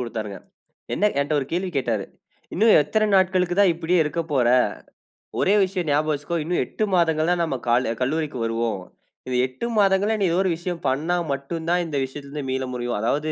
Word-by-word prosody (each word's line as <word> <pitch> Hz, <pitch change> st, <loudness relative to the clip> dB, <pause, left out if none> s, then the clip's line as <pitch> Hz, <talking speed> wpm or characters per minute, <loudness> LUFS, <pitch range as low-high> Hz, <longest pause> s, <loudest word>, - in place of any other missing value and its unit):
குடுத்தாருங்க. 110 Hz, -4 st, -5 dB, 0.6 s
என்ன 210 Hz, 0 st, +2 dB
என்ட 140 Hz, +2 st, -1 dB
ஒரு 135 Hz, -, -5 dB
கேள்வி 180 Hz, +2 st, -1 dB
கேட்டாரு. 115 Hz, -7 st, 0 dB, 0.5 s
"இன்னும் 220 Hz, +4 st, +5 dB
எத்தன 215 Hz, +8 st, 0 dB
நாட்களுக்கு 185 Hz, -1 st, +2 dB
தான் 190 Hz, -4 st, +5 dB
இப்படியே 170 Hz, +2 st, +1 dB
இருக்க 160 Hz, +3 st, -2 dB
போற? 125 Hz, -4 st, +3 dB, 0.9 s
ஒரே 200 Hz, +2 st, +3 dB
விஷயம் 180 Hz, -4 st, -3 dB
ஞாபகம் 150 Hz, +2 st, +2 dB
வச்சுக்கோ. 145 Hz, +4 st, -3 dB
இன்னும் 175 Hz, +3 st, 0 dB
8 -, -, -3 dB
மாதங்கள் 165 Hz, -1 st, +2 dB
தான் 175 Hz, -1 st, +1 dB
நம்ம 150 Hz, -5 st, -1 dB
கால 120 Hz, -1 st, +2 dB
கல்லூரிக்கு 150 Hz, +1 st, -1 dB
வருவோம். 115 Hz, -3 st, -1 dB, 0.5 s
இந்த 125 Hz, -1 st, -1 dB
8 130 Hz, -, -6 dB
மாதங்கள்ல 200 Hz, +2 st, +3 dB
நீ 200 Hz, -, +2 dB
ஏதோ 175 Hz, -, +1 dB
ஒரு 185 Hz, -, +1 dB
விஷயம் 170 Hz, 0 st, -5 dB
பண்ணா 155 Hz, +7 st, 0 dB, 0.2 s
மட்டும் 150 Hz, +4 st, -4 dB
தான் 175 Hz, 0 st, +2 dB
இந்த 150 Hz, -3 st, -3 dB
விஷயத்துல 140 Hz, +1 st, -10 dB
இருந்து 145 Hz, -2 st, -5 dB
மீள 130 Hz, 0 st, -1 dB
முடியும். 120 Hz, -2 st, -2 dB
அதாவது, 150 Hz, +7 st, 0 dB
155 Hz, 185 wpm, -23 LUFS, 130-180 Hz, 0.9 s, இன்னும்